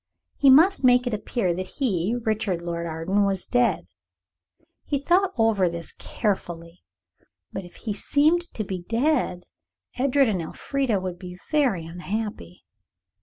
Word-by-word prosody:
He 275 Hz, -, +6 dB
must 325 Hz, +6 st, +6 dB
make 250 Hz, 0 st, +5 dB
it 245 Hz, -, -2 dB
appear 205 Hz, -3 st, -1 dB
that 185 Hz, +1 st, -6 dB
he, 215 Hz, -, 0 dB
Richard 210 Hz, -6 st, -1 dB
Lord 170 Hz, 0 st, -3 dB
Arden, 165 Hz, +6 st, 0 dB
was 195 Hz, -2 st, 0 dB
dead. 240 Hz, -, +1 dB, 1.0 s
He 285 Hz, -, -1 dB
thought 355 Hz, +7 st, +2 dB
over 220 Hz, -5 st, +3 dB
this 170 Hz, -1 st, -7 dB
very -, -, -12 dB
carefully. 175 Hz, -5 st, -3 dB, 0.7 s
But 190 Hz, -, -5 dB
if 175 Hz, -, -15 dB
he 215 Hz, -, -4 dB
seemed 310 Hz, -, +1 dB
to 215 Hz, -, -2 dB
be 190 Hz, -2 st, -5 dB
dead, 230 Hz, -, 0 dB, 0.6 s
Edred 275 Hz, +1 st, +3 dB
and 195 Hz, -5 st, 0 dB
Elfrida 245 Hz, -, -1 dB
would 185 Hz, -1 st, -5 dB
be 180 Hz, -1 st, -9 dB
very 255 Hz, -, +2 dB
unhappy. 180 Hz, -, -6 dB
205 Hz, 145 wpm, -24 LUFS, 175-255 Hz, 1.0 s, He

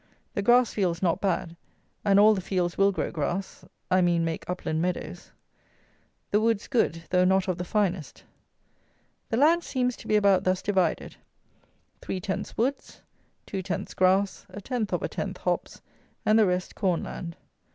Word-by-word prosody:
The -, -, -1 dB
grass 240 Hz, +3 st, +4 dB
fields 180 Hz, -3 st, -1 dB
not 175 Hz, +1 st, +1 dB
bad, 175 Hz, -3 st, -1 dB, 0.5 s
and 200 Hz, -1 st, +4 dB
all 215 Hz, +1 st, +7 dB
the 195 Hz, -, -2 dB
fields 180 Hz, -2 st, -1 dB
will 195 Hz, 0 st, +4 dB
grow 190 Hz, -, -3 dB
grass; 175 Hz, +5 st, -3 dB, 0.3 s
I 185 Hz, 0 st, +5 dB
mean 170 Hz, -2 st, +2 dB
make 165 Hz, +1 st, -4 dB
upland 160 Hz, -3 st, -2 dB
meadows. 180 Hz, 0 st, -4 dB, 1.0 s
The 210 Hz, -, +3 dB
woods 225 Hz, -2 st, +1 dB
good, 170 Hz, -10 st, 0 dB
though 180 Hz, 0 st, +4 dB
not 190 Hz, +1 st, +3 dB
of 185 Hz, -1 st, -2 dB
the -, -, -1 dB
finest. 185 Hz, -5 st, -2 dB, 1.1 s
The 225 Hz, -, 0 dB
land 325 Hz, +6 st, +4 dB
seems 250 Hz, -3 st, -1 dB
to -, -, -12 dB
be 215 Hz, -, +2 dB
about 200 Hz, -3 st, +4 dB
thus 185 Hz, 0 st, 0 dB
divided: 190 Hz, -5 st, 0 dB, 0.8 s
3 190 Hz, -, -4 dB
tenths 190 Hz, +1 st, -4 dB
woods, 265 Hz, +5 st, -2 dB, 0.4 s
2 195 Hz, -, -4 dB
tenths 180 Hz, -2 st, -4 dB
grass, 190 Hz, +1 st, +1 dB
a -, -, -8 dB
tenth 225 Hz, 0 st, -3 dB
of -, -, -1 dB
a -, -, 0 dB
tenth -, -, -4 dB
hops, -, -, -3 dB, 0.4 s
and 215 Hz, +1 st, +5 dB
the 215 Hz, -, +5 dB
rest 180 Hz, 0 st, -1 dB
corn 185 Hz, -5 st, 0 dB
land. 170 Hz, -1 st, -7 dB
190 Hz, 170 wpm, -27 LUFS, 180-210 Hz, 1.1 s, all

